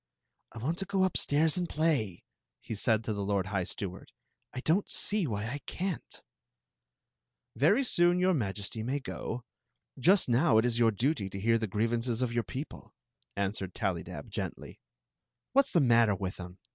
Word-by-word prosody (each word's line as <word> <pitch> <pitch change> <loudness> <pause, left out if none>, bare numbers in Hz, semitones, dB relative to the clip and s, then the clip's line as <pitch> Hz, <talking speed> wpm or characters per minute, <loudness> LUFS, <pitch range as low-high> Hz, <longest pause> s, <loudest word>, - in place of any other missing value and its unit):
" - - -52
I - - -10
want 150 +10 -2
to 195 - -2
go 195 -1 +1
upstairs 160 -3 +2
and 175 -1 -1
play," 145 - 0 0.4
he - - -7
said 110 +1 +1
to 110 - -2
the 100 -1 -3
lord 100 -1 0
high 95 -2 -1
steward. 95 -1 -6 0.2
" - - -51
I 130 - -3
don't 170 +8 +1
see 205 -5 0
why 105 -3 -2
I 130 +6 -4
can't" 185 -2 -4 1.3
"Very 170 - +4
soon 175 -7 +3
your 185 +1 +3
Majesty 105 - -3
may 130 +6 -1
go. 125 -2 -5 0.6
Just 185 +9 +4
now 120 0 +4
it 110 - +4
is 120 -1 +1
your 115 -1 +5
duty 115 -1 0
to 95 - -6
hear 115 +3 +3
the 110 - -2
grievances 115 +4 0
of 120 -2 -2
your 120 - +2
people," 135 +6 -8 0.4
answered 100 -2 -2
Tallydab, 95 -7 -3
gently. - - -5 0.4
" 120 - -60
What 275 0 +5
's - - -4
the 170 - +5
matter 115 -5 +4
with 95 -1 -5
'em? 90 0 -8
120 Hz, 185 wpm, -30 LUFS, 105-160 Hz, 1.3 s, your